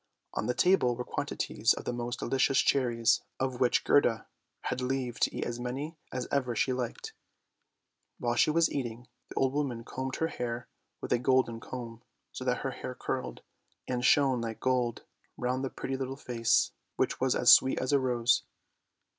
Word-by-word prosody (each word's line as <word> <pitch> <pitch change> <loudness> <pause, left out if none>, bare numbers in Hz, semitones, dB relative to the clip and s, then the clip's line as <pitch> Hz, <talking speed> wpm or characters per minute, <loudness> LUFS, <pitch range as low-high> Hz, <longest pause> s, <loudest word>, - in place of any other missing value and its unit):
On - - -2
the 125 - 0
table 180 -10 +3
were 125 - -4
quantities - - 0
of - - -7
the 125 - -2
most 120 0 -3
delicious 135 0 +1
cherries, 120 -4 +3 0.2
of 130 -2 -2
which 125 - +3
Gerda 120 -5 +3 0.4
had 130 - -3
leave 125 -2 -2
to - - +2
eat - - -2
as 120 0 -4
many 135 +7 -4 0.2
as 125 -1 -3
ever 125 -4 0
she 130 - +1
liked. 125 -2 -4 1.0
While 120 -1 0
she 120 - +3
was 165 +1 +3
eating, 120 -2 -4 0.2
the - - -10
old 135 0 +1
woman 135 -5 -2
combed 130 +2 -4
her 160 - 0
hair 120 -3 -4 0.3
with - - -1
a 120 - +2
golden 130 -2 +2
comb, 115 -2 -7 0.3
so - - -6
that - - 0
her - - 0
hair - - -6
curled, 60 -1 -4 0.4
and 125 -1 -2
shone 135 -3 +4
like 115 -1 -4
gold 125 -2 0 0.3
round 125 +2 -1
the 135 - -1
pretty 135 - -4
little 135 0 -4
face, 115 -4 +1 0.2
which - - 0
was 130 -1 +2
as 120 -1 +8
sweet 130 - +5
as 130 +2 -1
a 140 - +5
rose. 125 -2 +2
125 Hz, 180 wpm, -30 LUFS, 120-130 Hz, 1.0 s, as